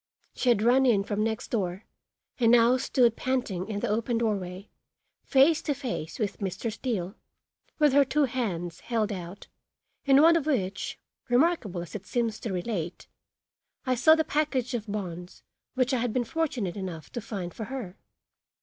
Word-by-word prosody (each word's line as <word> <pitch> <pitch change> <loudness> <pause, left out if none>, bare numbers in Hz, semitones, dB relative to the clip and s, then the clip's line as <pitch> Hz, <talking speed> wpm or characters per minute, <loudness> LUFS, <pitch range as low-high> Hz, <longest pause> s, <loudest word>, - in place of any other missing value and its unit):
She 255 - 0
had 220 -3 +3
run 260 +3 +4
in 205 -5 +3
from 210 +1 -1
next 220 -1 -2
door 190 -3 -2 0.5
and 230 -2 +4
now 240 +1 +6
stood 245 -3 +2
panting 235 -8 -2
in 205 -2 -3
the - - 0
open 230 +2 0
doorway 200 -4 -2 0.5
face 295 +4 +4
to 290 - -1
face 235 - -5
with 210 -4 -2
Mr. 195 +3 -3
Steele, 205 -7 -3 0.6
with 300 -3 +4
her 285 0 +6
two 295 +2 +1
hands 190 -10 -2
held 225 -3 -1
out, 180 0 -7 0.6
in 275 -1 +6
one 335 +1 +7
of 315 -3 0
which, 195 -10 -1 0.3
remarkable 245 - +2
as 175 - -12
it 195 -2 -7
seems 230 -3 -1
to 225 - -4
relate, 180 -2 -4 0.8
I 255 - +2
saw 315 +6 +6
the 320 - +1
package 280 -5 -1
of 220 -3 -3
bonds 180 -3 -6 0.3
which 255 +1 +1
I 255 - +2
had 235 -2 -1
been 250 - +1
fortunate 275 - -2
enough 180 -5 -6
to 240 - -4
find 195 -5 -5
for 220 - -6
her. 220 -6 -7
230 Hz, 170 wpm, -27 LUFS, 195-260 Hz, 0.8 s, one